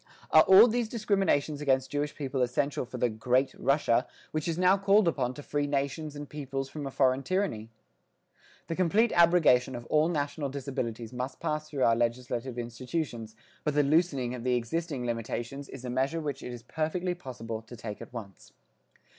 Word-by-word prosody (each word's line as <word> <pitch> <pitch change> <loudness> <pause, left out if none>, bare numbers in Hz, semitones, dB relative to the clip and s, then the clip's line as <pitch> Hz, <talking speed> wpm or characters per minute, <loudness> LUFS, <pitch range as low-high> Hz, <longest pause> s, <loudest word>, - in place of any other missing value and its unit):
Are 155 - +9
all 190 +7 +8
these 235 -1 0
discriminations 195 -10 +1
against 135 -2 +1
Jewish 145 +1 -2
people 135 -2 -2
essential 125 +3 0
for 125 - -7
the 125 - +2
great 125 +4 +1
Russia, 135 -3 +2 0.2
which 155 +1 -2
is 165 -1 -1
now 185 +1 +5
called 200 0 +4
upon 130 -6 0
to 145 - -9
free 145 0 -1
nations 145 +2 -2
and 145 0 -7
peoples 135 -2 -4
from 145 -1 -5
a - - -3
foreign 130 0 +2
tyranny? 160 - -1 1.0
The 165 - -3
complete 200 +7 +3
abrogation 165 -8 +4
of 120 0 -7
all 155 +2 +4
national 145 -2 -2
disabilities 130 -4 -4
must 125 +1 -4
pass 155 0 -2
through 140 -4 -1
our 115 - +5
legislative 120 +1 -2
institutions, 120 -1 -4 0.3
but 150 -2 -1
the 145 - +4
loosening 140 -5 +2
of 125 -2 -6
the 125 0 +2
existing 135 +2 -2
limitations 120 +4 -4
is 130 -2 -9
a - - -3
measure 135 +6 0
which 145 -3 -4
it 125 - -6
is 120 -1 -8
perfectly 175 +6 -2
possible 115 -9 -6
to 115 +2 -12
take 110 -2 -7
at - - -9
once. 105 -6 -10
140 Hz, 180 wpm, -29 LUFS, 125-155 Hz, 1.0 s, Are